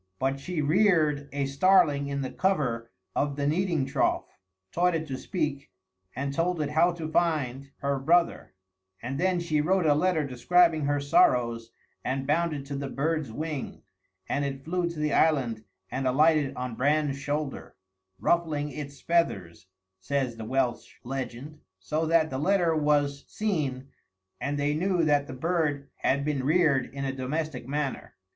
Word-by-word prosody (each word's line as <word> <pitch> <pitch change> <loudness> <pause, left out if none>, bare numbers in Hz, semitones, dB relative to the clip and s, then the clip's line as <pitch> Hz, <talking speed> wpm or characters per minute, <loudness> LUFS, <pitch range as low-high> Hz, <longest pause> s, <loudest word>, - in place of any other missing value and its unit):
But 135 +1 -1
she 155 +2 -3
reared 155 -4 +2
a 140 0 -1
starling 145 0 +3
in 140 -1 -2
the 130 - -4
cover 125 -12 0 0.3
of 145 0 0
the 140 0 -2
kneading 165 -1 +1
trough, 135 - -1 0.3
taught 180 0 +2
it 160 -1 -2
to 135 - -2
speak, 140 - -3 0.5
and 140 +2 -2
told 170 +3 0
it 150 -1 -1
how 165 +3 +4
to 165 -2 -5
find 145 -5 0
her 140 -1 0
brother; 170 - +1 0.4
and 130 +4 -4
then 185 0 +2
she 160 -3 0
wrote 180 +3 +2
a 150 - +5
letter 160 0 +1
describing 160 +4 +3
her 145 0 +1
sorrows 120 -4 +2 0.3
and 135 +1 -2
bound 165 +4 +1
it 145 -2 -5
to 140 0 -5
the 140 0 -3
bird's 155 -2 -1
wing, 150 +2 -5 0.4
and 145 - 0
it 135 -1 -4
flew 175 +1 0
to 170 - -8
the 150 -1 0
island 125 -9 +2 0.3
and 130 0 -1
alighted 150 +1 +3
on 125 -1 -4
Bran's 145 +2 +1
shoulder, 145 0 -4 0.4
"ruffling 155 -4 0
its 140 -1 -7
feathers" 100 - 0 0.3
(says 130 +3 -1
the 115 -1 -7
Welsh 125 0 -1
legend) 135 +3 -6 0.2
"so 155 +12 -2
that 160 -2 +3
the 130 - -2
letter 175 0 +2
was 145 -2 +1
seen, 145 -11 -2 0.5
and 145 +1 -2
they 145 +1 +1
knew 180 +2 +1
that 145 -2 +2
the - - -7
bird 145 -1 -1
had 140 +1 0
been 145 -3 -1
reared 150 -4 +2
in 140 0 -4
a 135 - -2
domestic 135 0 -3
manner." 145 0 -3
145 Hz, 165 wpm, -27 LUFS, 135-160 Hz, 0.5 s, a